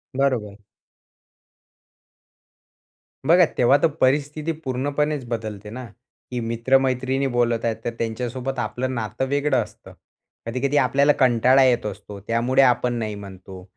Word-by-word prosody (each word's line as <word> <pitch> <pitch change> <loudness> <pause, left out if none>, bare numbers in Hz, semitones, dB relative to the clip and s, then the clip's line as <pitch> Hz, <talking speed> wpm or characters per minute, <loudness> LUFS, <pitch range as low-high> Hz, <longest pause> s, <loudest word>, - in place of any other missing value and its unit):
बरोबर. 120 -7 0 2.7
बघा 170 +4 +6
तेव्हा 130 +3 +5
तर - - +7
परिस्थिती 145 +4 +1
पूर्णपणेच 145 -1 -2
बदलते 110 -3 -5
ना, 125 +3 -7 0.5
की 125 - -2
मित्र-मैत्रिणी 130 +3 +1
बोलत 120 -1 +1
आहेत 115 - 0
तर - - +1
त्यांच्यासोबत 125 +3 -3
आपलं 130 +1 -3
नातं 115 +3 -3
वेगळं 140 -1 +1
असतं. - - -15 0.5
कधी-कधी 130 +5 -1
आपल्याला 140 +2 +3
कंटाळा 130 +1 +4
येत 120 -3 +2
असतो. 105 0 -7
त्यामुळे 115 +5 +1
आपण 125 -1 +2
नाही 110 -3 -3
म्हणतो. 95 -2 -11
125 Hz, 120 wpm, -22 LUFS, 115-135 Hz, 2.7 s, तर